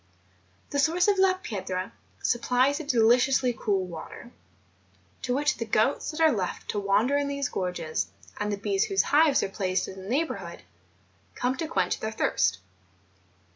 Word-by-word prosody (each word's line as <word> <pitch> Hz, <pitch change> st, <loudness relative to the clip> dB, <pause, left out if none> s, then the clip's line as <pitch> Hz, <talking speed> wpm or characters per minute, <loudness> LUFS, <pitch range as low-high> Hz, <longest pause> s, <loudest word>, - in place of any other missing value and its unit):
The 285 Hz, -, 0 dB
source 335 Hz, +5 st, +3 dB
of 400 Hz, -2 st, +3 dB
La 380 Hz, -1 st, +4 dB
Piedra 190 Hz, -, -5 dB, 0.3 s
supplies 250 Hz, +4 st, +2 dB
a -, -, -5 dB
deliciously 250 Hz, 0 st, +3 dB
cool 195 Hz, -4 st, 0 dB
water, 180 Hz, +7 st, -9 dB, 0.9 s
to 255 Hz, -2 st, -1 dB
which 295 Hz, +2 st, +1 dB
the 230 Hz, -, -3 dB
goats 220 Hz, +5 st, +1 dB
that 310 Hz, -, -6 dB
are 320 Hz, -1 st, +5 dB
left 190 Hz, -7 st, -3 dB
to 205 Hz, -, -2 dB
wander 205 Hz, +7 st, +2 dB
in 285 Hz, 0 st, 0 dB
these 280 Hz, -2 st, -2 dB
gorges, 165 Hz, -, -2 dB, 0.3 s
and 210 Hz, 0 st, -1 dB
the 205 Hz, -, -2 dB
bees 390 Hz, -, 0 dB
whose 390 Hz, -3 st, +2 dB
hives 295 Hz, -1 st, +4 dB
are -, -, -2 dB
placed 190 Hz, -2 st, -1 dB
in 190 Hz, -, -9 dB
its 190 Hz, +1 st, -9 dB
neighbourhood, 200 Hz, -, -2 dB, 0.7 s
come 250 Hz, +1 st, 0 dB
to 325 Hz, -, -3 dB
quench -, -, 0 dB
their 220 Hz, -, -3 dB
thirst. 95 Hz, -, +1 dB
245 Hz, 165 wpm, -27 LUFS, 195-290 Hz, 0.9 s, are